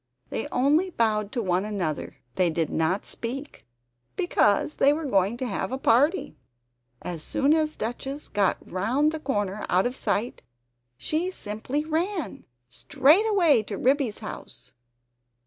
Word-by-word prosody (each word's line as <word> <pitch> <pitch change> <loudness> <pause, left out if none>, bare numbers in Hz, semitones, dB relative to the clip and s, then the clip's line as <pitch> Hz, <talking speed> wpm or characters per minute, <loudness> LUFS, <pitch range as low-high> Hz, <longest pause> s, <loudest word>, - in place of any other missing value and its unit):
They - - -2
only 295 +9 +2
bowed 215 - 0
to 240 - -1
one 185 0 +1
another; 190 -8 -3 0.2
they 180 +3 +2
did 160 -1 -1
not 160 +5 0
speak, 270 +5 -6 0.5
because 200 +9 +2
they 280 - +5
were 315 +1 -3
going 200 -2 +1
to 255 - -3
have 225 +1 -3
a 260 - -1
party. 285 +9 +2 0.6
As 170 -3 -5
soon 275 - +2
as 310 -1 +1
Duchess 270 +6 -5
had - - -19
got 200 -3 0
round 245 - +1
the 315 - -4
corner 205 -8 -2
out 185 +1 +3
of 250 +1 -1
sight 235 -2 -2 0.6
she 320 - -1
simply 255 - -4
ran! 325 - -2 0.2
Straight 275 - +3
away 340 - +4
to 205 -1 -6
Ribby's 265 -4 +1
house! 120 - -9
240 Hz, 145 wpm, -26 LUFS, 200-300 Hz, 0.6 s, they